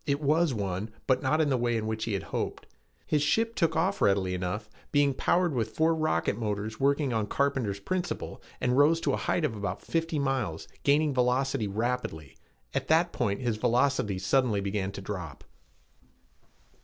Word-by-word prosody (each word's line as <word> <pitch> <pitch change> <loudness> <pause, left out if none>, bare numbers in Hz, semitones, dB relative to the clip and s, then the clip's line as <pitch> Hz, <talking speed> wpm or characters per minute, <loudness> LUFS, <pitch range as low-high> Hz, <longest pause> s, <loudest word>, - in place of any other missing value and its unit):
It 140 0 +1
was 155 +2 +2
one, 100 -2 -3 0.2
but 130 -1 +2
not 150 +4 +2
in 150 - +2
the 130 - +2
way 120 -1 +1
which 110 0 -2
he 115 - -2
had 95 - -2
hoped. - - -3 0.4
His 150 - +1
ship 225 +11 +2
took 165 -7 +1
off 185 +5 +1
readily 95 -2 +2
enough, 90 +4 -3 0.2
being 145 -1 +3
powered 175 +4 +1
with 115 -4 -2
four 160 +1 +3
rocket 155 - 0
motors 110 0 -3
working 140 -1 +2
on 110 -2 0
Carpenter's 130 -7 0
principle, 175 - -3 0.2
and 125 0 +1
rose 150 +4 +5
to - - +1
a - - +1
height 170 - 0
of 115 - -2
about 100 -1 -4
fifty 165 -1 -1
miles, 135 - -1
gaining 145 +1 +3
velocity 125 -2 +1
rapidly. 100 - -3 0.4
At - - -2
that 165 +2 +3
point 105 -1 -1
his 120 -4 -1
velocity 120 -3 +1
suddenly 110 +2 +2
began 100 0 -2
to 100 - -6
drop. 90 -8 -6
125 Hz, 175 wpm, -28 LUFS, 105-150 Hz, 0.4 s, rose